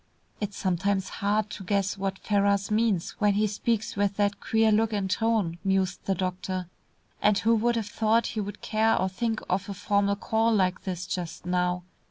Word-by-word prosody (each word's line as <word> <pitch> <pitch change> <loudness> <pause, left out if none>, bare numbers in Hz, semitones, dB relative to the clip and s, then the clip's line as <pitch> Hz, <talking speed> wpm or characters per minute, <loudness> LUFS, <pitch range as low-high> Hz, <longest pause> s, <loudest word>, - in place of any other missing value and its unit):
"It's 205 -1 -4
sometimes 190 +1 0
hard 210 +1 0
to 195 - -7
guess 200 +1 0
what 195 -1 -3
Ferrars 200 0 +1
means 210 -5 +1
when 205 -1 +3
he 210 +1 +3
speaks 215 +1 -1
with 200 0 0
that 205 0 +1
queer 220 0 +2
look 220 +1 +2
and 200 -2 0
tone," 205 -5 0
mused 190 -2 0
the 195 - +1
doctor. 185 0 -3 0.5
"And 210 -1 +4
who 225 +3 +3
would 235 +2 +1
have 225 -2 -1
thought 225 +2 +2
he 215 - -1
would 205 0 -7
care 220 +1 +2
or 185 - +1
think 225 +3 -2
of 190 +2 -1
a 200 - -4
formal 200 0 +1
call 225 +2 +1
like 185 -1 +1
this 180 -2 -3
just 175 -3 -5
now! 180 0 0
200 Hz, 190 wpm, -27 LUFS, 190-215 Hz, 0.5 s, And